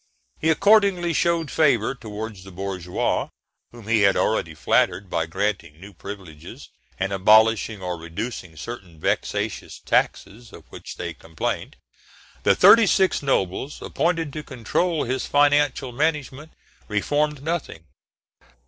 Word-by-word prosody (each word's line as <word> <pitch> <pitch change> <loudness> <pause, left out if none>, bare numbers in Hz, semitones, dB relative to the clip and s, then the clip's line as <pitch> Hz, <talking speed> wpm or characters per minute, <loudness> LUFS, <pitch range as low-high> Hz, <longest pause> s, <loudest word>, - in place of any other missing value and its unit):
He 160 - +1
accordingly 195 -1 +4
showed 170 -2 0
favour 130 -7 +2
towards 110 -5 -8
the 95 - -11
bourgeois, 90 -1 -2 0.4
whom 120 -3 -13
he 115 -2 +3
had 100 -1 +4
already - - 0
flattered, 95 -1 +1
by 80 -1 -1
granting 95 -4 -3
new 100 +3 -12
privileges, 95 -8 -10 0.3
and 95 +1 -1
abolishing 110 +1 +4
or 90 -2 -4
reducing 85 +1 -6
certain 90 -3 -9
vexatious - - -2
taxes 115 +3 -1
of - - -12
which - - -9
they - - -5
complained. 80 -1 -4 0.7
The - - +4
thirty 230 -2 +7
six 190 0 +2
notables 135 0 -1
appointed 165 -4 -1
to 155 - -4
control 150 - -1
his 130 +1 -2
financial 145 -2 +2
management 150 +1 -2 0.3
reformed 145 +7 -1
nothing. 155 - -4
115 Hz, 125 wpm, -23 LUFS, 95-150 Hz, 0.7 s, thirty